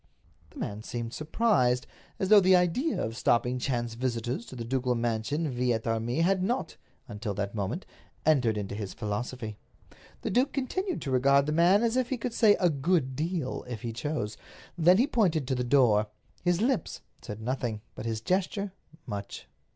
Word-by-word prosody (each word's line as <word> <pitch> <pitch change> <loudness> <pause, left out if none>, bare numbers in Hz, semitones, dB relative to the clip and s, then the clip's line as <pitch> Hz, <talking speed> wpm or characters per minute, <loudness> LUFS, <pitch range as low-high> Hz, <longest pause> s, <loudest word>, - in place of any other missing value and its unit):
The - - -16
man 105 +1 -4
seemed 115 0 -5
surprised, 145 - +2 0.3
as 190 - -1
though 210 -1 +9
the 185 -1 +5
idea 180 - +1
of 110 +1 -2
stopping 125 +1 +1
chance 120 -3 -1
visitors 120 0 -2
to - - -9
the 115 -2 -5
ducal 125 0 0
mansion 120 +7 -1
vi 125 -2 0
et 110 0 -3
armis 115 +6 0
had 190 +1 +2
not, 215 -2 -1 0.3
until 105 -3 -4
that 100 0 -3
moment, 105 - -3 0.4
entered 125 -8 +3
into 100 -1 -4
his 100 -2 -5
philosophy. 110 +1 -4 0.6
The - - -1
duke 255 +8 +2
continued 360 +7 -2
to 135 - -3
regard 140 +2 +4
the 150 - -1
man 175 +7 +4
as 235 +1 +1
if 255 -1 +1
he 260 - -1
could 235 0 -4
say 215 -3 +5
a 180 - +4
good 140 -2 +1
deal, 160 -2 -2
if 120 -3 -6
he 115 -1 -3
chose. 125 -4 -3 0.4
Then 175 +2 +5
he 245 - +4
pointed 175 - +1
to - - +2
the 125 -1 0
door. 120 -5 +4 0.4
His 175 +1 +2
lips 245 -7 0 0.2
said 105 0 -7
nothing, 120 -2 -2
but 115 - -6
his 110 -1 -2
gesture 190 - -1 0.3
much. 100 - -6
130 Hz, 180 wpm, -29 LUFS, 115-180 Hz, 0.6 s, though